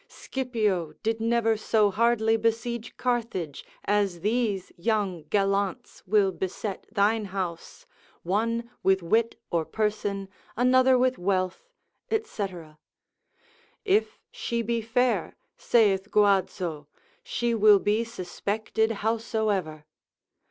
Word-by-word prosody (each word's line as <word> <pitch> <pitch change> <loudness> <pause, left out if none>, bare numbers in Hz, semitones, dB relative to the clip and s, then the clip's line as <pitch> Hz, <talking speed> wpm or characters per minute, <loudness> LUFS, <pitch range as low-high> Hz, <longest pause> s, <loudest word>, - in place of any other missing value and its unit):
Scipio 215 - -2
did 225 0 -1
never 230 -1 +2
so 215 -1 +2
hardly 225 +1 +2
besiege 230 +1 -2
Carthage, 230 - -2 0.2
as 200 -4 +1
these 210 -2 0
young 190 -4 -1
gallants 195 +1 -1
will 200 -1 +3
beset 190 +2 -5
thine 215 +1 +2
house, 190 - -5 0.4
one 230 +6 -1
with 190 -1 +2
wit 225 +7 +1
or 170 -2 +1
person, 205 0 -2 0.3
another 255 +1 +5
with 255 0 +1
wealth, 185 - -1 0.4
&c. 435 - -2 1.4
If 420 +2 +2
she 235 0 -2
he 230 +1 -1
fair, 245 +2 0 0.2
saith 205 -4 +2
Guazzo, 185 -7 +1 0.3
she 240 -1 -1
will 215 -2 +6
be 210 +3 +1
suspected 220 +1 -2 0.2
howsoever. 215 -9 -1
215 Hz, 100 wpm, -27 LUFS, 190-230 Hz, 1.4 s, will